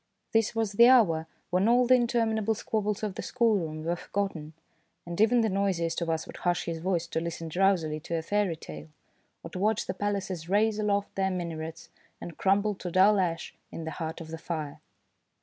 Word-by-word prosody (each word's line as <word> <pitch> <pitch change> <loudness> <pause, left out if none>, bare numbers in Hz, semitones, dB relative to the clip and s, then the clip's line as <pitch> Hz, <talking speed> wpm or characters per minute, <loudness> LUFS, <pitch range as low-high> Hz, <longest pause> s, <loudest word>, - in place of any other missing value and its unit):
This 225 0 +2
was 225 -3 0
the 235 +4 +7
hour 175 -11 +5 0.2
when 185 +4 +2
all 245 +2 +5
the 255 - +5
interminable 225 -3 +2
squabbles 210 -1 -2
of 210 -3 -1
the - - -5
schoolroom 195 -11 0
were 170 +2 0
forgotten, 175 -5 -4 0.5
and 175 +3 -3
even 235 +2 +5
the 225 - +2
noisiest 185 -4 0
of 170 - -1
us 160 -1 -1
would - - -10
hush 175 0 0
his 165 -1 -3
voice 175 -1 0
to 165 - -2
listen 165 -1 -5
drowsily 175 -3 +1
to 170 +2 -4
a 160 - -3
fairy 205 -1 0
tale, 75 - -10 0.5
or - - -8
to 180 - -5
watch 215 +2 +1
the - - -3
palaces 190 -4 -3
raise 210 +2 +2
aloft 205 -1 0
their 190 0 0
minarets, 165 -3 -5 0.3
and 170 - -8
crumble 200 +2 +2
to 185 -2 -6
dull 190 +4 +5
red 185 -2 +3
ash 165 - -9 0.2
in 165 - -6
the 160 - -4
heart 160 -1 -5
of 165 -1 -9
the 165 0 -6
fire. 155 -4 -5
185 Hz, 200 wpm, -28 LUFS, 165-210 Hz, 0.5 s, the